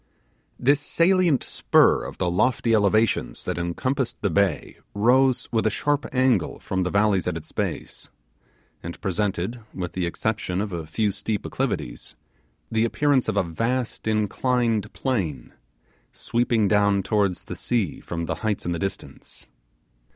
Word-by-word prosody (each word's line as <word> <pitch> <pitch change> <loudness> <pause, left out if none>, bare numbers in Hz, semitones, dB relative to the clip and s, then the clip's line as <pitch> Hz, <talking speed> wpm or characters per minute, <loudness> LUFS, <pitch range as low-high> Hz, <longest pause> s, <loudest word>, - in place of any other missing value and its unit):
This 140 +4 +3
salient 170 -1 +2
spur - - +3
of - - -8
the 90 - 0
lofty 115 +4 +2
elevations 110 +1 +2
that - - -3
encompassed 125 +9 -2
the - - 0
bay 95 -10 0 0.2
rose 125 +4 +3
with 110 -2 +1
a - - +4
sharp 145 +6 0
angle 125 -7 +2
from 95 0 -2
the 90 - 0
valleys 100 -2 +2
at 90 -2 -1
its 80 -1 -10
base, - - -4 0.7
and 85 +1 -7
presented, 100 +2 -2 0.2
with 90 -2 -4
the 90 -2 -1
exception 95 0 -2
of 100 -2 -3
a 80 -2 -4
few 105 +4 0
steep 105 +1 -3
acclivities, - - -3 0.6
the 110 0 +2
appearance 135 +2 +2
of - - -1
a 100 - +3
vast 115 +9 -2
inclined 110 +1 +1
plane, 85 - -2 0.6
sweeping 115 -3 +1
down 100 -1 +3
towards 100 -5 0
the - - -7
sea 110 -10 -1
from 85 -1 -4
the 80 -1 -3
heights 110 -2 -1
in 85 - -1
the 85 - -2
distance. 95 0 -6
105 Hz, 150 wpm, -24 LUFS, 90-120 Hz, 0.7 s, a